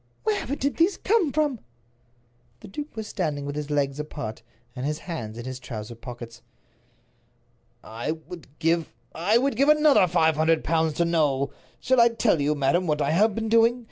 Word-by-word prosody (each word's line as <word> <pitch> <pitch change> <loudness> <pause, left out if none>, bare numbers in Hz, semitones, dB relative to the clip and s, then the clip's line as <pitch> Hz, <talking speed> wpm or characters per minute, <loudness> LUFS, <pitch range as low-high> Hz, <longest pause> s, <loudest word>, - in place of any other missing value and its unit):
Wherever 215 +6 -1
did 280 0 -2
these 345 +3 +3
come 390 -8 +2
from?" 295 -5 0 1.0
The - - -10
duke 290 +10 -7
was 220 -1 -5
standing 150 -9 -3
with 145 0 -4
his 150 0 -4
legs 140 -1 0
apart, 115 -8 -6 0.3
and 125 - -5
his 150 +2 -1
hands 115 - -5
in 120 - -7
his 130 0 -6
trousers 115 -2 -8
pockets. 120 -1 -9 1.4
"I 115 +5 -6
would 160 +1 -6
give—I 165 +4 0
would 270 +1 +1
give 275 +5 +3
another 300 -10 +5
five 160 -2 +2
hundred 160 0 +2
pounds 160 -1 +1
to 170 - +1
know. 145 -5 +1 0.3
Shall 260 -2 +3
I 235 - +7
tell 225 -8 +1
you, 150 +2 +1
madam, 145 +6 +1
what 150 -1 +1
I - - +1
have 205 +5 +3
been 225 0 -2
doing? 230 +2 +4
165 Hz, 175 wpm, -25 LUFS, 140-225 Hz, 1.4 s, I